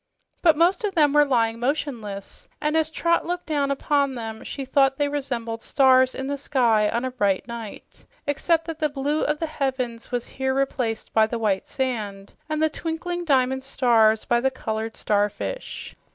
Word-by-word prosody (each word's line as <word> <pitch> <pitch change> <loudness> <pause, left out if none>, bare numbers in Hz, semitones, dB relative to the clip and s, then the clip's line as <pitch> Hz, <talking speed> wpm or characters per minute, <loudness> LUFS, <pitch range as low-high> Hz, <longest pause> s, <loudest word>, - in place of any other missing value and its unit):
But 325 -4 +5
most 355 +7 +3
of 405 -2 -1
them 295 -3 +4
were 295 0 +6
lying 230 -5 +1
motionless, 240 -7 -3
and 300 +1 0
as 320 -1 +2
Trot 335 +1 +1
looked 355 +1 -3
down 290 -3 0
upon 280 -1 +1
them 225 -2 -6
she 275 - -5
thought 270 0 +3
they 290 - +1
resembled 240 -6 -3
stars 260 -1 +4
in 265 - -4
the 280 +1 -3
sky 230 -7 +2
on 235 +2 -1
a 260 - -2
bright 205 -6 0
night, 230 -3 -9 0.2
except 325 +3 +1
that 325 -1 -6
the 305 - +1
blue 290 +2 -1
of 300 0 0
the 330 - -1
heavens 260 -6 -3
was 245 -1 -2
here 265 0 -2
replaced 250 -4 -1
by 220 -1 +4
the 235 - -3
white 205 -4 0
sand, 210 -7 -3 0.2
and 310 0 0
the - - +5
twinkling 345 +2 -4
diamond 265 -3 +2
stars 230 -5 +3
by 240 - +2
the 265 - +2
colored 220 -3 -4
starfish. 210 - -2
265 Hz, 180 wpm, -24 LUFS, 230-295 Hz, 0.2 s, were